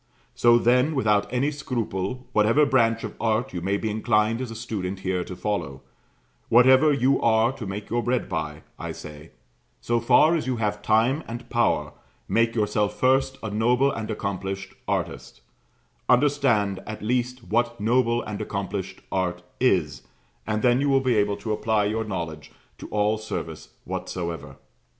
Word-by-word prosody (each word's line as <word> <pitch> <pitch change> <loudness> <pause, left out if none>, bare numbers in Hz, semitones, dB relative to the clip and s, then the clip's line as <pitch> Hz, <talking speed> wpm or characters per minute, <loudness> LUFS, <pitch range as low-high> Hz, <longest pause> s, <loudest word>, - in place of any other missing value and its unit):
So, 120 0 +5
then, 125 +6 +3
without 105 -6 +1
any 130 +4 +1
scruple, 120 -4 -3
whatever 115 +8 +4
branch 115 -5 +2
of - - -5
art 115 +3 0
you 90 - -4
may 100 +3 0
be 110 +1 -2
inclined 110 +1 +1
as 130 - -4
a 115 - -7
student 100 -5 -4
here 95 -1 -1
to 90 - -8
follow, 100 -10 -3 0.7
whatever 130 +5 +6
you 135 -1 +2
are 115 +1 +3
to 125 -6 -7
make 100 +2 -6
your 120 +1 +1
bread 125 +1 -1
by, 75 0 -4 0.2
I - - -5
say, 75 +1 -10 0.5
so 120 0 0
far 125 +7 +5
as 155 - -2
you 130 - 0
have 105 -2 -2
time 115 +9 +2
and 120 +1 -7
power, - - +1 0.3
make 115 0 +1
yourself 105 -1 0
first 135 +1 +2
a 110 - -3
noble 125 +6 +2
and 110 -3 -5
accomplished 95 -2 -4
artist; - - -3 0.7
understand 125 -7 +3
at 110 -1 -6
least 125 +2 -1
what 120 +2 0
noble 120 +2 +2
and 105 0 -5
accomplished 100 -2 -4
art 90 -2 -1 0.2
is, 90 - +1 0.5
and 105 0 -1
then 125 +1 +4
you 145 - +1
will 135 -1 +4
be 130 -2 +2
able 105 -1 +1
to 110 +1 -3
apply 105 -1 +1
your 110 +2 -1
knowledge 85 -7 -5 0.3
to - - -8
all 105 +1 0
service 110 - -6 0.2
whatsoever. 85 -4 -5
110 Hz, 165 wpm, -25 LUFS, 100-125 Hz, 0.7 s, whatever